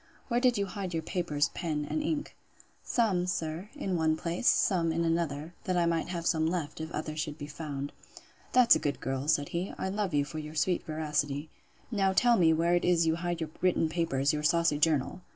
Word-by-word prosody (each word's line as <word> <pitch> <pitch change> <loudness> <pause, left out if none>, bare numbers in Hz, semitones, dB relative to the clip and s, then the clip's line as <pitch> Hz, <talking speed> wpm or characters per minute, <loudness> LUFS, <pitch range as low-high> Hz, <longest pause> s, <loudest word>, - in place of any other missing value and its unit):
Where 240 0 +2
did 250 -2 +3
you 200 - +1
hide 190 -3 -5
your 160 - -1
paper, 175 -6 -3
pens, 155 -4 -2
and 310 - -1
ink? 300 -1 -2 0.5
Some, 195 -7 +1
sir, 170 +2 -3
in 195 -11 -2
one 160 -1 +2
place, 170 +8 -2
some 170 -4 +3
in 165 +1 0
another; 165 -1 -1
that 185 -1 0
I 175 - +3
might 165 -1 0
have 170 -2 -4
some 160 -2 +2
left, 165 -3 -3
if 160 - -5
others 155 0 -4
should 150 0 -3
be 145 - -6
found.—That's 150 - 0
a - - 0
good 145 -1 -2
girl! 135 +2 -3
said 145 -2 +2
he; 175 +3 -3
I 190 - -2
love 195 -4 -1
you 145 -1 +2
for 155 +2 -6
your 155 0 -7
sweet 175 +3 +1
veracity. 150 -1 -2 0.4
Now 195 -3 +2
tell 240 +4 +5
me 170 -6 +5
where 165 +2 +2
it 175 - +2
is 175 -2 +3
you 160 0 +2
hide 175 -1 -3
your 155 -1 -3
written 180 -3 +2
papers, 155 -5 0
your 150 - -1
saucy 165 -1 +2
journal? 150 +1 +1
165 Hz, 210 wpm, -30 LUFS, 155-180 Hz, 0.5 s, tell